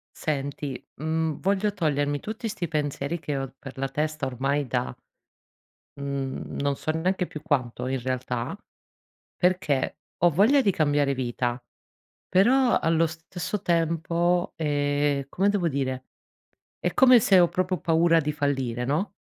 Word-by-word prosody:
Senti 140 -2 -3 0.2
mhmm, 160 +1 -1
voglio 200 +2 +1
togliermi 145 -6 0
tutti 220 +2 -5
sti 190 -5 -3
pensieri 150 +1 -2
che 145 -3 -3
ho 135 -1 -4
per 135 -2 -10
la 135 0 -1
testa 155 +2 -2
ormai 135 +3 -1
da 65 - -2 1.0
mhmm 140 -1 -4
non 140 0 +1
so 155 - -3
neanche 180 +3 0
più 150 - -9
quanto 125 -4 -1
in 130 0 -1
realtà, 125 +3 -3 0.8
perché 180 -7 +1 0.2
ho 175 - +5
voglia 220 - +4
di 205 - +3
cambiare 145 -4 +2
vita, 120 -1 -2 0.7
però 245 +7 +4
allo 165 0 +3
stesso 170 +5 -5
tempo 170 0 +1
è 145 -2 0
come 195 +7 +1
devo 195 -4 +1
dire, 130 -3 -2 0.8
è - - -1
come 255 -3 +7
se 195 -3 +5
ho 175 - +5
proprio 185 +1 -1
paura 165 +1 +4
di 150 0 -2
fallire, 135 -5 -1
no. 170 +9 -1
150 Hz, 140 wpm, -26 LUFS, 140-175 Hz, 1.0 s, come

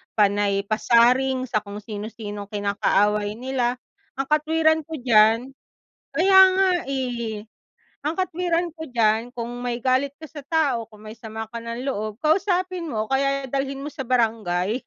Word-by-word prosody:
panay 200 -1 +2
pasaring, 245 +5 +3
sa 215 - 0
kung 205 0 -9
sino-sinong 210 -1 -7
kinakaaway 205 0 +1
nila. 250 0 -1 0.4
Ang 270 0 -3
katwiran 315 +1 +3
ko 320 - -5
diyan, 225 -2 +5 0.7
kaya 380 +5 +4 0.2
nga 380 0 +3 0.2
eh. 240 -5 -3 0.7
Ang 320 - -1
katwiran 350 -1 0
ko 320 -2 -8
diyan 230 -1 +1
kung 235 0 -4
may 245 -1 -2
galit 265 +2 +1
ka 315 - -16
sa 305 0 -10
tao, 275 -9 +1
kung 215 -1 -16
may 215 - -8
sama 220 0 -6
ka 235 - -5
ng 230 +3 -6
loob, 215 -1 -4
kausapin 365 +1 +1
mo 215 -4 -2
o - - -18
kaya 275 0 +1
dalhin 275 0 -2
mo 295 - -5
sa 275 - -6
barangay. 220 -3 0
240 Hz, 155 wpm, -23 LUFS, 215-280 Hz, 0.7 s, diyan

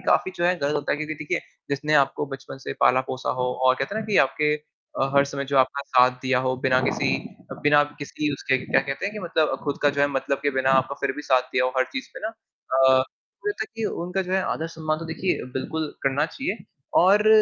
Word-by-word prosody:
काफ़ी - - +3
जो 175 - -1
है 180 +1 +4
गलत 145 0 0
होता 145 - 0
है - - 0
क्योंकि 155 0 -3
देखिए 155 0 -2 0.3
जिसने 150 +2 0
आपको 135 +1 -3
बचपन 135 -1 -8
से - - -3
पाला-पोसा 130 0 +2
हो - - +1 0.2
और 130 - +6
कहते 135 +9 -3
हैं 220 - -1
ना, 215 - -10
कि 210 - +1
आपके 150 +3 0 0.5
अ, 135 +1 +1
हर 140 0 +6
समय 140 0 -4
जो 140 - +3
आपका 130 +2 +2
साथ 125 0 +4
दिया 130 -1 +2
हो 130 0 +1
बिना 130 -1 +4
किसी - - 0 0.5
बिना 145 0 +6 0.2
किसी 150 +1 -2
उसके 135 -1 0
क्या - - +3
कहते 135 +6 -3
हैं? 205 - -3
कि - - -5
मतलब 160 -3 +1
खुद 145 -2 -2
का 145 - +5
जो - - +1
है 145 - +5
मतलब 140 0 -1
के 145 - +2
बिना 130 0 +1
आपका 130 +2 -6
फिर - - 0
भी 150 - -5
साथ 130 -3 +3
दिया 125 - +2
हो, 130 - +1
हर 130 - +4
चीज़ 265 - -4
पे - - -8
ना - - -1
अ, 130 -12 +1 0.4
मुझे - - 0
लगता 410 - -3
है - - -64
कि 225 - -2 0.2
उनका 180 +2 -1
जो 185 0 -5
है 190 0 +2
आदर-सम्मान 160 -1 -3
तो 165 - -7
देखिए 165 +3 -2
बिल्कुल 155 +4 -3
करना 135 +3 +1
चाहिए, 230 +1 -4 0.4
और 205 +4 +5
145 Hz, 240 wpm, -24 LUFS, 130-165 Hz, 0.5 s, और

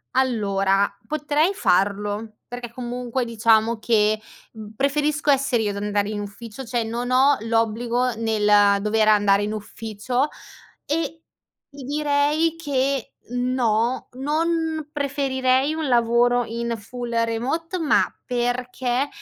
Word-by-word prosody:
Allora 200 -6 +1
potrei 305 - +1
farlo, 205 - 0
perché 245 -1 -7
comunque, 245 +1 -3
diciamo, 225 0 +2
che, 215 -1 +2 0.3
mhmm, 215 -1 -10
preferisco 295 +3 +1
essere 265 -4 +2
io 205 - 0
ad 200 - -6
andare 205 0 -1
in 210 - -3
ufficio 210 +4 -8
cioè, 235 0 -1
non 235 +2 -3
ho 270 +3 +5
l'obbligo 230 +2 0
nel 210 -2 +3
dover 215 0 +2
andare 205 -2 +4
in 210 +1 -2
ufficio 220 +5 -3 0.6
e, 320 +2 -2 0.5
ti 280 -1 -10
direi, 295 +3 +1
che 275 -4 -1 0.2
no, 245 -1 0
non 315 +3 -1
preferirei 270 -1 +1
un 315 -2 -2
lavoro 240 0 +3
in 235 +1 -3
full 240 +3 -7
remote, 270 +11 -2
ma 315 -3 +3 0.2
perché 250 +1 -1
245 Hz, 120 wpm, -23 LUFS, 220-275 Hz, 0.6 s, ho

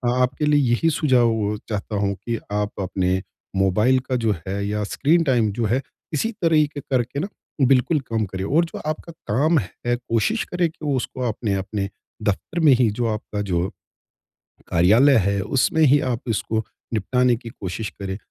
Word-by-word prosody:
आपके 125 +3 +1
लिए 150 -1 +4
यही 165 +7 +3
सुझाव 115 -8 +2
चाहता 105 0 -3
हूँ 100 0 +1
कि 115 +2 -4
आप 105 0 -1
अपने 95 0 0 0.3
मोबाइल 105 +7 +3
का 130 - +1
जो 115 -3 +1
है 100 +1 -2
या 105 0 -1
स्क्रीन 160 +10 +2
टाइम 120 -7 +2
जो 115 +3 -2
है, 120 +6 +1 0.3
इसी 190 +10 0
तरीके 155 -3 +2
करके 130 +1 -1
न 180 - -2 0.4
बिल्कुल 135 +4 +3
कम 110 -1 +1
करें। 95 0 -5
और 160 +10 +3
जो 165 - -8
आपका 155 +2 -4 0.2
काम 155 +6 +3
है, 120 +4 -3
कोशिश 120 - 0
करें 175 -2 0
कि 160 - -21
वो 145 - +1
उसको 130 +1 -4
आपने 110 -2 -2
अपने 100 +1 -3 0.3
दफ़्तर 105 - -1
में 155 -4 +6
ही 125 -2 +3
जो 120 +3 -2
आपका 105 -1 -4
जो, 90 -2 -1 1.0
कार्यालय 110 +12 +5
है 100 0 +1
उसमें 130 +9 +1
ही 145 0 +6
आप 120 - -3
इसको 110 0 -1 0.3
निपटाने 125 +3 +2
की 115 0 -9
कोशिश 105 0 -5
करें। 95 -1 -4
120 Hz, 175 wpm, -22 LUFS, 105-140 Hz, 1.0 s, में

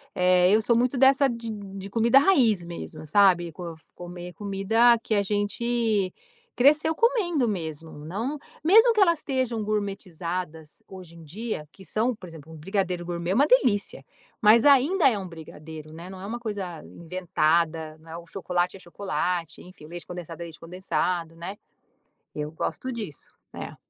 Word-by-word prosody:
eh, 180 0 +4
eu 220 - +4
sou 235 +2 +2
muito 250 +3 +1
dessa 270 +1 +5
de 230 -2 -5
de 195 -2 -7
comida 235 +5 +5
raiz 240 - +3
mesmo 170 -2 -8
sabe. 175 -1 +4
Co 170 +1 -7 0.2
comer 175 0 -8
comida, 210 +4 +3
que 220 - 0
a 200 - +2
gente, 210 0 0 0.4
cresceu 300 +5 +4
comendo 360 - +2
mesmo 160 -4 -5
não 230 - -3 0.3
mesmo 445 +8 +6
que 425 - +2
elas 340 -4 +5
estejam 255 -6 -2
"gourmetizadas" 180 -6 -4
hoje 180 -3 -11
em 165 - -13
dia. 175 -1 -5
Que 195 - -15
são 230 +2 0
por 185 - -11
exemplo. 160 -1 -12
Um - - -10
brigadeiro 180 +1 -2
gourmet 170 +1 -3
é - - +1
uma 285 +4 +4
delícia. 205 - +2 0.4
Mas, 225 +4 +6
ainda 285 +3 +5
é 215 - -1
um 190 - -6
brigadeiro, 160 -2 -10
né, 170 +2 -9
não 190 -1 -9
é 195 - -7
uma 235 +3 -4
coisa 200 -7 -5
inventada, 165 -2 -1
né, 160 +1 -11
o 170 - -10
chocolate 180 0 -2
é - - -17
chocolate, 175 -3 -3
enfim, 180 -4 -14
o - - -11
leite 175 0 -8
condensado 175 -1 -8
é - - -4
leite 160 -2 -11
condensado, 170 -1 -2
né, 185 +5 -7 0.8
eu 150 0 -4
gosto 255 +9 -4
disso, 210 - -7 0.2
é. - - -7
190 Hz, 170 wpm, -26 LUFS, 170-230 Hz, 0.8 s, mesmo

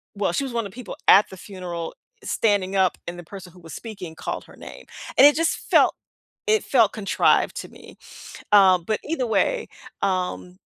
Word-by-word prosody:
well, 200 -4 -1
she 275 - 0
was 260 - -6
one 230 -2 -1
of 190 - -16
people 240 -4 -9
at 200 - +7
the 190 - -11
funeral 180 -4 -7 0.3
standing 200 -3 0
up 190 -2 +2
and 175 +1 -6
the - - -9
person 180 0 -11
who 180 - -17
was 165 -1 -11
speaking 195 -8 -8
called - - -5
her - - -17
name. - - -11 0.3
And - - +9
it 290 - +4
just 330 +1 +1 0.2
felt, - - +5 0.5
it 435 0 +3
felt 230 -6 +3
contrived 200 -3 +1
to - - -12
me. - - -15 0.6
Um, 190 -3 +6
but 215 +2 -1
either 300 -5 -2
way, 465 - 0 0.4
um 185 -1 -2
195 Hz, 190 wpm, -23 LUFS, 180-230 Hz, 0.6 s, And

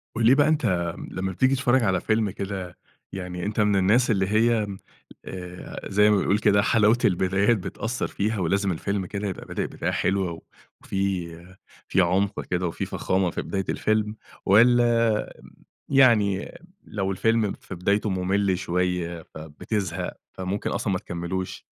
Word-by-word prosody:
قل 115 - +1
لي 125 +4 +7
بقى 145 +1 +4
أنتَ 95 - 0 0.2
لمّا 95 +1 -3
بتيجي 130 +8 +2
تتفرج 130 -1 +2
على 95 -4 +1
فيلم 110 -1 +1
كده 95 -2 -6 0.3
يعني 90 -2 -5
أنتَ 105 +1 -2
من 105 -1 +3
الناس 105 +6 +3
اللي 95 -3 +1
هي 110 +1 +2 0.6
آآ 90 -1 -8
زي 105 +1 +4
ما 105 - +4
بيقول 100 +1 +2
كده 100 -1 +4
حلاوة 110 +2 +4
البدايات 95 +4 +2
بتأثَّر 110 +5 -3
فيها 105 +1 -2
ولازم 95 +3 +1
الفيلم 100 +3 -2
كده 100 +2 -4
يبقى 95 - -6
بادئ - - -3
بداية - - -3
حلوة 95 -2 0
و 80 - -9 0.4
وفي 95 -3 -2 0.6
في 95 - +3
عُمق 95 +3 0
كده 90 0 -1
وفي 85 - -3
فخامة 95 -1 0
في - - -3
بداية 95 -1 -3
الفيلم 110 0 0 0.3
والّا 115 +1 +4 0.6
يعني 115 -8 +3 0.3
لو 95 -2 -3
الفيلم 110 +1 +1
في - - -10
بدايته 100 +4 0
ممل 95 0 +1
شوية، 90 -2 -2
فبتزهق 80 +4 -4 0.2
فممكن 95 +2 -3
أصلًا 100 - -1
ما 90 - 0
تكملوش؟ 90 0 -5
100 Hz, 150 wpm, -25 LUFS, 90-110 Hz, 0.6 s, لي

